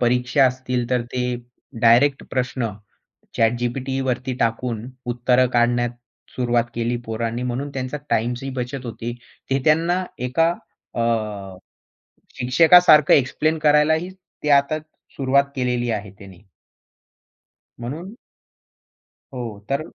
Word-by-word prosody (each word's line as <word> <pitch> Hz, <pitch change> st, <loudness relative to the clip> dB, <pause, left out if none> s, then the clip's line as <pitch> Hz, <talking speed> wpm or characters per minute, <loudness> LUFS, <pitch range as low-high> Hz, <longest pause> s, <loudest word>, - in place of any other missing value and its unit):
परीक्षा 125 Hz, +3 st, +3 dB
असतील 125 Hz, -1 st, -2 dB
तर 125 Hz, -1 st, +2 dB
ते 125 Hz, -, -2 dB, 0.6 s
डायरेक्ट 125 Hz, +5 st, +5 dB
प्रश्न 125 Hz, -2 st, -1 dB, 0.7 s
ChatGPTवरती 125 Hz, +2 st, 0 dB
टाकून 115 Hz, 0 st, -1 dB, 0.3 s
उत्तरं 125 Hz, +1 st, +3 dB
काढण्यास 120 Hz, 0 st, +2 dB, 0.5 s
सुरुवात 120 Hz, -2 st, +1 dB
केली 120 Hz, +1 st, -1 dB
पोरांनी, 115 Hz, +2 st, -3 dB
म्हणून 125 Hz, +3 st, -3 dB
त्यांचा 130 Hz, +2 st, -3 dB
टाईमची 120 Hz, +4 st, 0 dB
ही 135 Hz, -, -4 dB
बचत 125 Hz, 0 st, -4 dB
होते. 115 Hz, +1 st, -5 dB, 0.4 s
ते 135 Hz, -, +2 dB
त्यांना 170 Hz, +4 st, +2 dB
एका 125 Hz, +7 st, +2 dB, 0.4 s
अ, -, -, -2 dB, 1.4 s
शिक्षकासारखं 155 Hz, +4 st, +6 dB
एक्सप्लेन 155 Hz, +4 st, +1 dB
करायलाही 155 Hz, +4 st, +3 dB, 0.3 s
ते 150 Hz, -, 0 dB
आता 140 Hz, +2 st, +4 dB, 0.4 s
सुरुवात 140 Hz, +1 st, +3 dB
केलेली 125 Hz, -1 st, 0 dB
आहे 105 Hz, -3 st, -3 dB
त्याने. 95 Hz, -2 st, -14 dB, 1.4 s
म्हणून 160 Hz, -, -6 dB, 1.2 s
हो, 115 Hz, -5 st, -6 dB
तर 140 Hz, +2 st, 0 dB
125 Hz, 105 wpm, -22 LUFS, 120-140 Hz, 1.4 s, शिक्षकासारखं